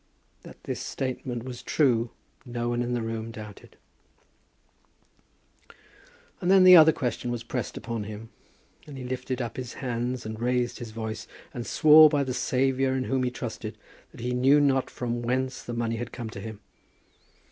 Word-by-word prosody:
That - - -14
this - - -4
statement 125 -2 -4
was 125 -1 -7
true, 120 -6 +2 0.3
no 120 -1 -3
one 120 0 0
in 120 0 -1
the 120 - -2
room 115 0 -4
doubted. 105 -2 -11 2.6
And 175 - 0
then 190 -1 +7
the 185 0 +10
other 160 -1 +9
question 125 -3 -3
was 120 -1 -3
pressed 120 +1 -4
upon 115 -3 -4
him; 110 +2 -8 0.6
and 145 -2 -9
he 130 - -6
lifted 130 0 -3
up 115 - -6
his 125 -2 -5
hands, 125 -1 -3
and 110 0 -6
raised 125 0 0
his 120 - -6
voice, 110 0 -5 0.3
and 120 -1 -5
swore 155 0 +8
by 145 -1 +1
the 130 -2 -3
Saviour 130 +1 +1
in 130 - 0
whom 130 0 0
he 125 - +1
trusted, 125 - -6 0.3
that - - -12
he 125 +1 -2
knew 135 +4 +5
not 135 -2 +2
from 120 -1 -3
whence 130 +1 -1
the - - -7
money 115 -1 -2
had 120 +1 -5
come 115 -3 -6
to 100 - -8
him. 110 0 -8
125 Hz, 175 wpm, -27 LUFS, 115-130 Hz, 2.6 s, the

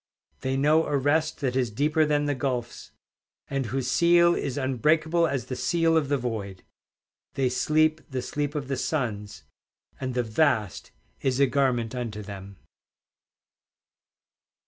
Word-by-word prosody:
They 130 0 -2
know 155 +4 +3
a 145 - +1
rest 155 +4 0
that 130 -3 -1
is 130 -3 +1
deeper 150 +7 +1
than 145 -1 +1
the 145 - 0
gulfs, 130 -3 -4 0.6
And 135 -3 -1
whose 130 +2 -2
seal 170 +4 +4
is 140 -5 -3
unbreakable 155 +6 +2
as 135 -5 -2
the 130 - -5
seal 165 +6 +1
of 150 -4 +1
the 145 - +2
void; 105 -7 -5 0.7
They 130 -2 +1
sleep 155 +4 +2
the 130 -2 -3
sleep 145 +3 -3
of 140 -3 -3
the 135 -1 -2
suns, 110 - -3 0.6
And 130 -1 -4
the 125 - +1
vast 110 - 0 0.3
is 130 0 0
a 140 - +6
garment 125 -4 0
unto 115 -4 -5
them. 100 -1 -9
135 Hz, 145 wpm, -26 LUFS, 120-150 Hz, 0.7 s, a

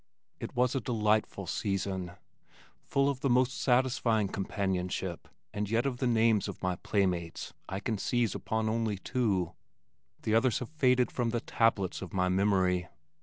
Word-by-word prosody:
It - - -6
was 125 0 +2
a 135 - 0
delightful 110 -2 0
season, 95 -3 -2 0.7
full 140 0 +1
of 140 -2 -1
the 135 - 0
most 125 +1 +2
satisfying 120 -5 +2
companionship 95 -3 -2 0.3
and 105 -1 -2
yet 115 +3 +1
of 130 -3 -1
the 130 - 0
names 115 -3 +3
of - - -6
my 90 -1 0
playmates 90 -5 -1 0.2
I 95 +1 -3
can 110 -3 -2
seize 120 -2 +1
upon 110 0 -2
only 110 -2 0
two 95 -5 0 0.7
the 110 - 0
others 115 +1 +3
have 125 - -5
faded 125 -5 +2
from 120 -2 0
the 120 +1 0
tablets 110 -5 +1
of 95 -4 -7
my 90 -1 +1
memory. 95 -2 +2
110 Hz, 160 wpm, -30 LUFS, 95-120 Hz, 0.7 s, names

